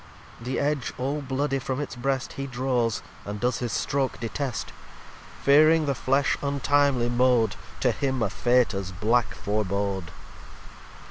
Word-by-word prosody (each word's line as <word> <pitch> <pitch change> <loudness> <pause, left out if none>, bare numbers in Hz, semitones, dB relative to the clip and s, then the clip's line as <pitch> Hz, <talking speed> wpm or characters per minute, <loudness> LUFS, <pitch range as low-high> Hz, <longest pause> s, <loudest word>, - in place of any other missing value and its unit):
The 125 +2 -2
Edge 145 -3 0
all 140 +4 -2
bloody 135 +1 -1
from 130 +1 -3
its 145 -2 -4
Breast 135 +1 -2
He 135 0 -4
draws, 125 -3 0 0.2
and 105 +1 -5
does 120 -1 0
his 120 -2 -2
stroke 135 +4 -1
detest; 125 +2 -4 0.7
Fearing 155 +3 +6
the 140 - +1
Flesh 135 +2 +1
untimely 140 -3 +2
mow'd 120 -3 +3 0.3
To 125 - +3
him 130 0 -1
a 105 - -1
Fate 120 +2 +2
as 95 -1 -4
black 110 +6 +1
forebode. 100 -3 -2
125 Hz, 140 wpm, -26 LUFS, 115-140 Hz, 0.7 s, Fearing